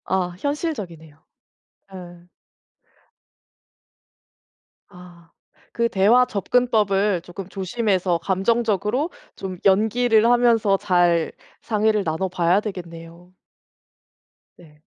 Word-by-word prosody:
아 180 -1 -2
현실적이네요. 185 - -5 0.7
네. 175 -2 -12 2.6
아. 175 -3 -16 0.4
그 235 0 +1
대화 230 +4 +4
접근법을 205 -4 +1
쪼끔 180 +2 -9
조심해서 190 -3 -1
감정적으로 215 - 0 0.3
좀 190 -1 -6
연기를 220 +3 +3
하면서 230 -4 +3
잘 175 -3 +1 0.3
상의를 215 -1 0
나눠 160 +4 -2
봐야 180 +2 +1
되겠네요. 175 -3 -9 1.2
네. 150 -3 -20
195 Hz, 190 characters per minute, -22 LUFS, 175-220 Hz, 2.6 s, 대화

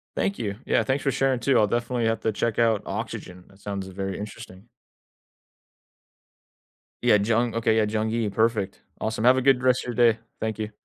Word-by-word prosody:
Thank 200 - -1
you, 100 -3 -3
yeah, - - +2
thanks 135 +1 -1
for 135 - +1
sharing 135 -1 +1
too. 130 +1 +2
I'll 105 - +4
definitely 120 +1 -1
have 115 0 +1
to 110 - 0
check 115 +2 -1
out 115 -3 +2
oxygen, 90 0 -6
that 95 0 -21
sounds 100 -2 -5
very 95 0 -4
interesting. 105 -1 -9 2.4
Yeah, - - +5
Jung, 115 +2 +1
okay 110 -1 +2
yeah, 110 - +3
Jung 110 0 -1
Yi, 115 -2 0
perfect, 110 -2 0 0.2
awesome. 110 0 -2
Have 125 +1 +6
a - - +2
good 130 -1 +3
rest 125 -1 +3
of 125 -1 -5
your 120 -2 +6
day, 110 - -17 0.2
thank 110 0 -3
you. 110 0 -3
110 Hz, 195 wpm, -25 LUFS, 105-120 Hz, 2.4 s, Have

